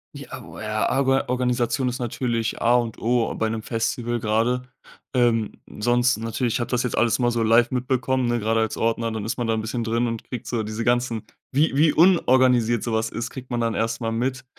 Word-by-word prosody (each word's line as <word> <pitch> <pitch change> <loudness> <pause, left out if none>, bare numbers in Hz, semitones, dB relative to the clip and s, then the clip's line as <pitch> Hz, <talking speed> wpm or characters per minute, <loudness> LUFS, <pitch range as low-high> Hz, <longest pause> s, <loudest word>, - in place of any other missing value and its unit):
I 140 -2 -9
ah, 135 - -7
o - - -12
a 110 0 -1
Arga 135 0 +2
Organisation 125 0 0
ist 125 - -4
natürlich 120 -2 -2
A 120 +1 +4
und 120 -2 -1
O 120 0 +1
bei 110 0 -1
'nem 110 -1 -4
Festival 120 +1 -2
grade. 115 +4 +1 0.5
Ähm, 115 -3 +2 0.3
sonst 120 +2 +2
natürlich, 115 +1 -2
ich - - 0
habe 120 - -3
das 125 0 0
jetzt 125 - -2
alles 120 -2 +3
mal 120 -1 +1
so 115 - -1
live 115 +3 +4
mitbekommen, 130 0 0
ne, 120 0 0
gerade 115 +1 +1
als 110 -1 -1
Ordner, 115 0 0
dann 110 -2 -4
ist 115 +1 -3
man 120 -2 -2
da 115 - +1
'n 110 - -2
bisschen 115 +2 -3
drin 115 +2 0
und 115 -2 -3
kriegt 125 -1 -7
so 115 -2 -2
diese 110 +2 -4
ganzen 120 -2 0 0.3
wie 145 +1 +2
wie 150 +2 +4
unorganisiert 130 - +4
sowas 110 -1 -1
ist, 115 - -5
kriegt 130 -1 -9
man 120 -1 -2
dann 115 -1 0
erst 115 +1 -2
mal 115 -1 -1
mit 130 +3 -2
120 Hz, 220 wpm, -23 LUFS, 115-125 Hz, 0.5 s, A